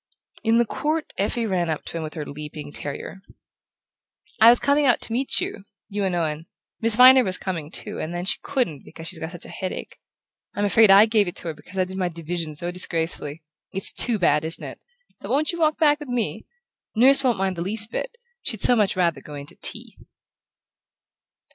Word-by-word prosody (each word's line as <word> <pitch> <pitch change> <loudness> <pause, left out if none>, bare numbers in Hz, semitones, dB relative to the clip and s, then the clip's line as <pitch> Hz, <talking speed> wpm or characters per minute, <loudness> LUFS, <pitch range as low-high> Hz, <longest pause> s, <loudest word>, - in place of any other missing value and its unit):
In 225 0 +3
the 235 - +3
court 305 +7 -3
Effie 225 +4 0
ran 180 -5 -1
up 155 - -3
to - - -6
him - - -4
with 155 +1 -7
her 155 -2 -5
leaping 150 0 -8
terrier. 145 +6 -7 1.2
"I 225 - +9
was 240 - +7
coming 285 0 +2
out 245 - +4
to 225 - -4
meet 260 +3 +2
you 200 - -4 0.3
you 205 -1 -2
and 185 -2 -1
Owen. 160 -1 -2 0.3
Miss 225 -1 +3
Viner 255 +2 +8
was 185 -4 -1
coming, 165 -6 -5
too, - - -4
and 155 - -4
then 175 +1 -4
she - - +2
couldn't 240 - -2
because 165 0 -9
she's - - -6
got 160 - -5
such 175 -1 -11
a - - -11
headache. 185 - -6 0.6
I'm 205 - 0
afraid 220 +1 +5
I 200 +2 +8
gave 215 -3 +2
it 175 - -5
to 170 - -5
her - - -4
because 155 +6 -13
I 185 - +3
did 190 +1 -7
my 180 -2 0
division 165 -1 -5
so 175 +4 -2
disgracefully. 165 -3 -2 0.3
It's 195 - +1
too 235 -3 +2
bad, 150 -5 +2
isn't 160 +1 -2
it? - - -10 0.4
But - - -9
won't 295 +2 +1
you 340 - -6
walk 310 -1 +2
back 295 -2 +3
with 295 -3 -9
me? 245 -2 -3 0.5
Nurse 270 +4 +6
won't 245 -4 +2
mind 190 -1 -1
the 170 - -5
least 210 +4 +2
bit; 480 - -5 0.2
she'd 220 -4 -2
so 245 - +5
much 210 -4 +1
rather 170 -6 0
go 150 - -10
in 140 0 -7
to - - -10
tea." - - -2
190 Hz, 215 wpm, -23 LUFS, 165-235 Hz, 1.2 s, I